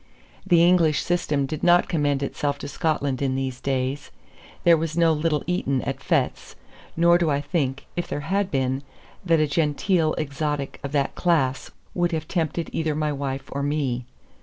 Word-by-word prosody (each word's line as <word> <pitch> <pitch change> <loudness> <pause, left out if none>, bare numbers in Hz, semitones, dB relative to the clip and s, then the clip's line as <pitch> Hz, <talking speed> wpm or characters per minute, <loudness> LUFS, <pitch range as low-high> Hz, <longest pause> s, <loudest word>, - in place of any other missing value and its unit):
The 170 -2 +5
English 170 -4 +4
system 155 -5 0
did 155 +2 -5
not 175 0 +4
commend 145 -4 0
itself 145 0 -2
to - - -7
Scotland 140 -3 -1
in 135 -2 0
these 130 -1 -3
days. 135 +1 -2 0.5
There 170 -1 +7
was 160 0 -3
no 165 -1 +4
little 150 -1 0
Eton 140 -7 0
at - - -3
Fettes; - - -1 0.4
nor 170 +1 +5
do 170 -2 +1
I 140 -1 +1
think, 140 -3 -2
if 175 - -2
there 145 - -3
had 195 +4 0
been, 130 -2 0 0.4
that 165 -3 +3
a 155 - +4
genteel 155 +2 +1
exotic 145 -1 -3
of 140 - -4
that 140 -2 +1
class 150 -7 +1 0.2
would 175 -1 0
have 160 -1 -2
tempted 165 -1 -2
either 160 -2 -1
my 150 0 0
wife 135 -1 -4
or 140 - -3
me. 140 -4 -1
150 Hz, 175 wpm, -24 LUFS, 140-165 Hz, 0.5 s, There